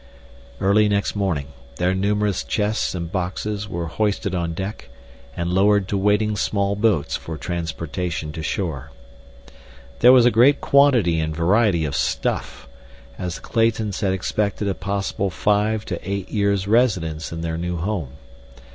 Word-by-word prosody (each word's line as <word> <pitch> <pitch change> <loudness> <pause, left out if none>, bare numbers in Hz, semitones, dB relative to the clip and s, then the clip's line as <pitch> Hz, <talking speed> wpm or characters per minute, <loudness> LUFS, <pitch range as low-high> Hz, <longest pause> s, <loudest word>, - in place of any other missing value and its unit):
Early 105 +2 +3
next 100 0 0
morning 85 -9 -1 0.3
their 90 +1 +1
numerous 100 0 0
chests 105 -2 -1
and 85 -1 -5
boxes 100 +3 -3
were 85 -2 -3
hoisted 100 +1 -1
on 85 -2 -2
deck 95 -9 -6 0.5
and 85 +1 -2
lowered 100 0 +3
to - - -1
waiting 105 +2 +2
small 100 -1 0
boats 105 -8 +1
for 80 -1 -6
transportation 85 -1 -4
to 80 - -6
shore. 75 -5 -3 1.1
There 125 - +8
was 125 -2 +7
a 120 - +5
great 125 +6 +5
quantity 125 - +4
and 80 0 -2
variety 90 0 +2
of 70 -1 -3
stuff, - - -2 0.5
as 90 -2 -3
the - - -9
Claytons 110 -3 0
had 95 -3 +1
expected 100 +2 -1
a 100 - +1
possible 100 +1 -2
five 105 +3 0
to 85 - -4
eight 100 0 -4
years' 100 -2 0
residence 95 -9 +1
in 85 0 -5
their 80 0 -3
new 90 0 -2
home. 85 -6 -3
95 Hz, 150 wpm, -22 LUFS, 85-105 Hz, 1.1 s, There